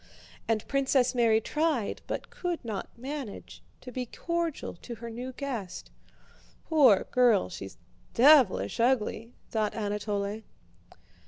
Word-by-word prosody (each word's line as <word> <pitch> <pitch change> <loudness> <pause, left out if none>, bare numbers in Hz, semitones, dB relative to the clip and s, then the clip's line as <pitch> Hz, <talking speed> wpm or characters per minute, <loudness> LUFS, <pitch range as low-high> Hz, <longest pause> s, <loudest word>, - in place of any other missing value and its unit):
And 225 -1 0
Princess 270 -2 +2
Mary 230 -3 +4
tried, 300 -3 -1
but - - -5
could 350 -7 -4
not 215 -4 -4
manage, 265 -3 -7 0.2
to 255 - -9
be 250 -1 -4
cordial 335 +3 -3
to 235 +6 -8
her 230 +1 -8
new 250 +3 -6
guest. 245 -9 -6 0.7
"Poor 275 - +5
girl, 240 - +4
she's 95 +1 -8 0.4
devilish 240 - +5
ugly!" 235 -1 0 0.2
thought 215 -2 0
Anatole. 205 0 -2
235 Hz, 115 wpm, -29 LUFS, 215-275 Hz, 0.7 s, Poor